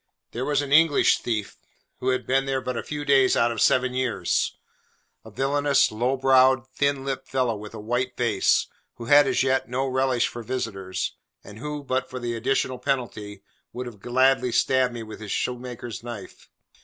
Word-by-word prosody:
There 125 +3 -3
was 145 -1 +1
an 140 - -7
English 160 -1 +5
thief, 110 -4 -3 0.4
who 130 - -1
had 130 -1 0
been 135 +1 +1
there 135 -1 0
but 125 -1 -4
a - - -2
few 150 -1 -6
days 135 -2 +4
out 115 0 +3
of 115 - -3
seven 130 0 +3
years: 125 -9 -1 0.7
a 110 - -12
villainous, 140 +5 +2
low 125 +5 0
browed, 130 -1 +4
thin 140 -1 0
lipped 135 -1 -4
fellow, 125 -4 0
with 105 +1 -9
a - - -7
white 120 +4 -2
face; 110 -5 +2 0.3
who 115 - -8
had 145 +3 +6
as - - +2
yet 130 -2 0
no 130 +2 -1
relish 130 -2 +1
for 120 - -7
visitors, 110 -6 -4 0.3
and 105 +1 -12
who, 150 +2 -5
but 130 -1 -2
for 130 - -6
the 120 -1 -3
additional 130 +2 -1
penalty, 110 -7 -3 0.3
would 125 +1 -5
have 115 -4 -9
gladly 125 +2 +2
stabbed 125 +1 +2
me 115 - -5
with 110 0 -10
his 110 -2 -7
shoemaker's 120 -3 -4
knife. 115 -4 -10
125 Hz, 185 wpm, -25 LUFS, 115-135 Hz, 0.7 s, had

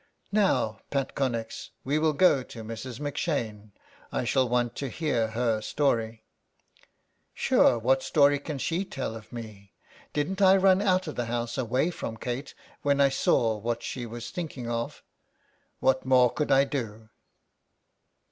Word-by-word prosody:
'' - - -41
Now, 190 - +2
Pat 135 -2 -2
Connex, 120 -5 -2
we 145 +3 +1
will 155 0 +2
go 150 -4 +4
to 115 -2 -9
Mrs. 115 +2 -7
M 145 -1 -3
'Shane. 110 - -3 0.4
I - - -1
shall 130 +1 +2
want 120 -1 0
to 140 - -3
hear 125 -7 0
her 115 -1 0
story." 115 -3 0 1.1
"Sure - - +4
what 130 +4 +2
story 140 +1 +4
can 145 0 -5
she 165 +7 -1
tell 135 - -5
of 110 -1 -11
me? 110 -5 -9 0.4
Didn't 185 +7 -2
I 190 0 +7
run 190 0 +4
out 185 -2 +2
of 155 - -5
the 120 - -2
house 120 0 -2
away 130 +6 0
from 115 -8 -6
Kate 125 +5 -5 0.3
when 140 0 +2
I 140 -1 +6
saw 115 -4 +2
what 115 +2 -3
she 120 -2 -4
was 115 +1 -7
thinking 150 -8 -5
of? 115 0 -3 0.8
What 130 0 +2
more 130 -2 +4
could 150 - -1
I 135 0 +6
do?" 110 -6 -5
130 Hz, 160 wpm, -27 LUFS, 115-145 Hz, 1.1 s, I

